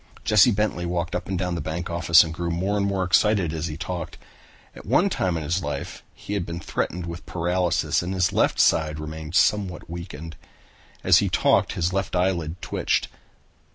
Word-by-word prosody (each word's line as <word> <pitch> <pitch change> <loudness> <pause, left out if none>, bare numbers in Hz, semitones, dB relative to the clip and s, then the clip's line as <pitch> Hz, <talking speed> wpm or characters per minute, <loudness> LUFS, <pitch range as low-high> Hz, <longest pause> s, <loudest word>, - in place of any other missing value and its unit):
Jesse 105 +2 +5
Bentley 105 -5 -1
walked 85 0 -2
up 90 - -3
and 95 - -2
down 90 0 -1
in - - -2
the 85 - -3
bank 80 +3 -4
office 85 0 +6
and 80 -1 -5
grew 85 +1 -3
more 95 +5 -1
and 100 -1 +1
more 95 -1 0
excited 90 -1 +2
as 80 +1 -3
he 75 -2 -6
talked. 85 -1 -5 0.6
At - - -11
one - - +2
time 90 -3 0
in 80 - -4
his 85 +5 -1
life 70 -3 -5
he 105 - -7
had 100 - -1
been 85 0 -6
threatened 90 +1 -3
with 85 0 -8
paralysis 85 -2 0
and 90 +1 -4
his 90 -1 +1
left - - +2
side 75 -1 +3
remained 80 +1 -7
somewhat 95 -6 +1
weakened. 85 -2 -8 0.7
As - - +6
he - - 0
talked - - +2
his 85 +1 -1
left 95 -1 -2
eyelid 90 -2 0
twitched. - - -1
85 Hz, 195 wpm, -24 LUFS, 80-95 Hz, 0.7 s, office